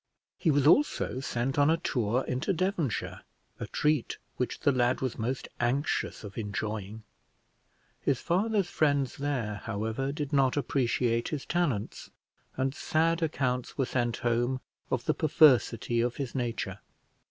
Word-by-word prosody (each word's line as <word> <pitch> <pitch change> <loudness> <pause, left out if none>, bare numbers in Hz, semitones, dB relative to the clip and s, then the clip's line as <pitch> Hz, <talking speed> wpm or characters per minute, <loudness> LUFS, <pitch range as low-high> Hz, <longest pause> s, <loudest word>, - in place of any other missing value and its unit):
He 170 - +2
was 145 -2 +3
also 165 - +3
sent 130 +1 -1
on 145 +1 +5
a 165 - +4
tour 120 -4 0
into 130 +10 -1
Devonshire; 175 - -1 0.4
a - - -4
treat 150 -4 0 0.2
which 125 - -2
the 145 - +4
lad 125 -1 +2
was 130 -3 -3
most 125 +4 -2
anxious 125 +2 0
of 105 +2 -7
enjoying. 105 0 -4 1.0
His 135 - 0
father's 200 +2 +1
friends 145 -5 +1
there, 125 -8 -2
however, 110 +5 -2
did 145 -1 -4
not 135 -1 +3
appreciate 120 -4 +1
his 150 -4 -4
talents, 150 -13 -1 0.5
and 130 0 0
sad 165 +3 +1
accounts 130 -6 -1
were 135 - +2
sent 120 -2 -1
home 120 +2 +1 0.3
of - - -1
the - - +2
perversity 125 - +4
of 120 0 0
his 135 -4 -4
nature. 115 -6 -3
130 Hz, 140 wpm, -29 LUFS, 120-145 Hz, 1.0 s, on